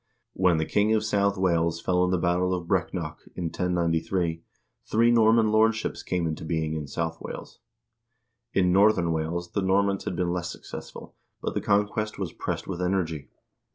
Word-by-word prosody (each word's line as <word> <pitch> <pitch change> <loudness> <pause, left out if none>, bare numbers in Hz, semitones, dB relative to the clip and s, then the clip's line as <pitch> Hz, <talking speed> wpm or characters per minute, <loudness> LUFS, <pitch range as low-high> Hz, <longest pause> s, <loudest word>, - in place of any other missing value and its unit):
When 90 -3 +3
the 80 - 0
king 105 +5 +2
of 110 - +1
South 100 -2 +1
Wales 85 -3 +1
fell 90 +1 +1
in 90 - +1
the 90 - +2
battle 90 +2 +1
of 90 -1 -5
Breck 90 -4 +1
nock, 80 -4 -5 0.2
in 90 - -4
1093, 85 0 0 0.4
three 115 +2 +3
Norman 115 -1 +4
lordships 110 +1 +2
came 90 -2 -1
into 80 -1 -3
being 80 -1 -1
in 75 -2 -4
South 80 +3 -3
Wales. - - -8 0.9
In 90 -4 +2
Northern 95 -4 +4
Wales 85 +2 -2
the 100 - -1
Normans 100 +1 +1
had - - -2
been 85 0 0
less 85 -1 -3
successful, - - -9 0.3
but - - -3
the - - -1
conquest 105 +1 0
was 95 -5 -4
pressed - - -4
with 90 -2 -4
energy. 85 -5 -1
90 Hz, 175 wpm, -26 LUFS, 85-100 Hz, 0.9 s, Norman